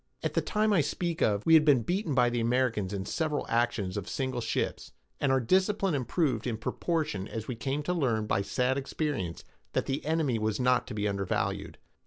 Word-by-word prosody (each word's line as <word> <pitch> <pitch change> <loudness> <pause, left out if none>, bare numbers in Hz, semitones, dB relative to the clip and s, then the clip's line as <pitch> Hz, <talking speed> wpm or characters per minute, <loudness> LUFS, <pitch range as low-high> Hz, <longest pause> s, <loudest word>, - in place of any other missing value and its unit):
At - - -1
the - - +2
time 215 0 +1
I 180 - +5
speak 170 +3 -2
of, 105 -1 +2
we 165 - +5
had 160 -1 +8
been 140 -6 +4
beaten 175 - -1
by 120 -2 +4
the 120 - 0
Americans 115 -4 +1
in 100 -2 -3
several 155 +2 -1
actions 115 -5 0
of 100 - -4
single 130 -2 -2
ships, 115 - -2 0.3
and 140 - +2
our 135 - +4
discipline 190 - +2
improved 140 +1 0
in 115 -3 -1
proportion 150 - -2
as 110 -1 -6
we 125 - -2
came 135 +6 -2
to 180 - -1
learn 120 -10 +1
by 100 -2 +1
sad 125 +6 0
experience 135 - -3 0.3
that - - 0
the 135 +2 -2
enemy 150 -6 +1
was 110 -1 -1
not 125 0 +2
to 115 - -6
be 105 0 0
undervalued. 100 -2 -2
125 Hz, 205 wpm, -29 LUFS, 110-155 Hz, 0.3 s, had